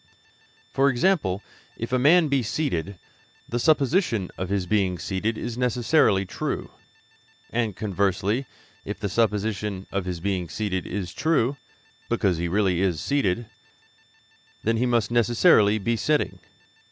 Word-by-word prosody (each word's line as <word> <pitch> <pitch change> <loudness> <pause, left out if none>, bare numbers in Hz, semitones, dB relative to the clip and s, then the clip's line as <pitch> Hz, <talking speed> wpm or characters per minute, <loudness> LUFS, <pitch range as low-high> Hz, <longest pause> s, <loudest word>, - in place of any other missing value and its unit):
For 135 +1 +4
example, 120 - +1 0.3
if 115 +2 -5
a 130 - +3
man 160 +5 +5
be 140 -2 +1
seated, 100 - -2 0.5
the 120 - -2
supposition 140 - +2
of 95 0 -4
his 100 -2 0
being 95 -2 +1
seated 100 +7 -2
is 120 0 -5
necessarily 120 -4 +2
true; - - -4 0.8
and, 115 -4 -1
conversely, 100 +5 -1 0.4
if - - -6
the 100 - -2
supposition 105 -2 -1
of 100 -2 -2
his 90 -2 -4
being 90 -2 -2
seated 95 0 -3
is 95 -2 -4
true, 145 -1 +1 0.5
because 90 -4 +1
he 85 - -1
is - - -2
really 95 -1 +2
seated, 115 - 0 1.2
he 115 +2 +2
must 120 -3 +1
necessarily 110 -2 +4
be 115 +3 0
sitting. 130 -7 0
105 Hz, 130 wpm, -25 LUFS, 95-120 Hz, 1.2 s, man